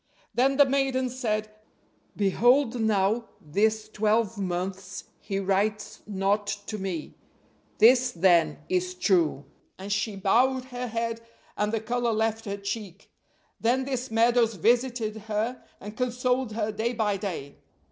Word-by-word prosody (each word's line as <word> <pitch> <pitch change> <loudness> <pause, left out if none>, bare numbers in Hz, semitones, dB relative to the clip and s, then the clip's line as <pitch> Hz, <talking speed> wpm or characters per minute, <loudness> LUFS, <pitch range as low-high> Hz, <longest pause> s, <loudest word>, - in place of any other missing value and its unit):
Then 270 +2 +2
the 285 - +7
maiden 265 -1 0
said: 215 -4 -2 0.6
'Behold 240 +5 +3
now 220 +1 +1
this 215 +7 0
twelve 215 +1 +1
months 185 -1 -4 0.2
he 195 - -4
writes 200 +2 -1
not 200 +1 0 0.2
to 215 0 -5
me, 185 -5 -4 0.6
this 245 +3 +6
then 170 -3 +3
is 180 0 -1
true'; 170 -7 +1 0.3
and 195 +2 -3
she 200 +1 -1
bowed 250 +7 +2
her 250 -1 -5
head, 230 0 -3 0.3
and 210 0 0
the 225 - 0
color 240 +1 0
left 225 0 -1
her 200 -1 -3
cheek. 200 -2 -6 0.5
Then 255 +3 +1
this 260 -1 -3
Meadows 230 0 +3
visited 230 +2 +1
her, 220 +4 -2 0.2
and 210 +2 -9
consoled 250 -1 0
her 215 -1 -1
day 220 +3 -2
by 210 -4 0
day. 170 -8 -5
215 Hz, 135 wpm, -27 LUFS, 195-245 Hz, 0.6 s, the